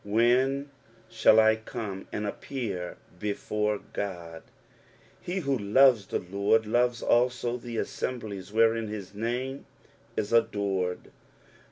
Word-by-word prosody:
" - - -33
When 130 +6 +2 0.4
tiiiU 110 0 +5
J - - -18
come 105 -5 -6
and 105 - -3
appear 105 -5 -4 0.2
before 105 +1 -1 0.2
Oodf" 85 -5 -5 0.8
He 185 +2 -3
who 140 -3 0
loves 115 0 +4
the - - -1
Lord 100 +4 +1
loves 120 +2 +1
also 120 0 +2
the 120 -1 -7
aasembiies 105 -5 -4
wherein 115 0 +3
his 105 -3 -7
name 125 +5 -3 0.5
is 105 +1 -1
adored. 100 -5 0
110 Hz, 120 wpm, -28 LUFS, 100-120 Hz, 0.8 s, tiiiU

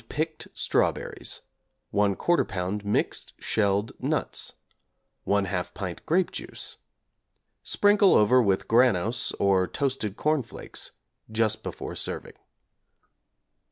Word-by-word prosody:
picked 155 +1 -3
strawberries, - - -1 0.5
1/4 100 -1 +2 0.3
lb. 95 +2 -3
mixed 105 0 -1
shelled 100 0 +1
nuts, - - -1 0.7
1/2 100 -3 0
pint 90 -3 -5
grape 180 +3 +2
juice. - - -7 0.8
Sprinkle 205 -1 +4
over 125 +5 +6
with 100 -4 +1
'Granose' 115 -2 +3
or 95 -2 +3
'Toasted 130 -8 -2
Corn 155 -1 +2
Flakes' 115 - -8 0.4
just 110 -1 +1
before - - -6
serving. - - -4
105 Hz, 95 wpm, -27 LUFS, 100-130 Hz, 0.8 s, over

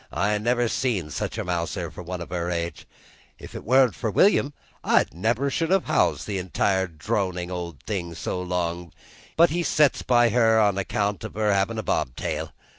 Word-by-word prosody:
I 105 +3 0
never 120 +2 +1
see 110 - -1
such - - -3
a - - -2
mouser 85 -1 -3
for - - -9
one 90 0 -6
of 85 - -8
her 85 -1 -2
age. 85 -2 -4 0.5
If't - - -9
wan't 130 -1 +4
for 110 - -3
William, 145 - +3 0.3
I - - +4
never 115 - 0
should 165 +2 -1
have 190 0 +2
housed 155 - +1
that 95 -3 -5
other 95 -1 +2
dronin' 90 +1 -2
old 85 -6 -6
thing 85 -6 -4
so 90 +2 -3
long; 85 -2 -3 0.4
but 170 0 +6
he 175 +2 0
sets 150 -4 +2
by 120 -1 +4
her 115 -1 +4
on 100 -2 +2
account 100 +1 -1
of - - -7
her 105 -1 +2
havin' 100 +4 0
a 110 - -2
bob 60 - -1
tail. - - -3
100 Hz, 190 wpm, -25 LUFS, 90-120 Hz, 0.5 s, but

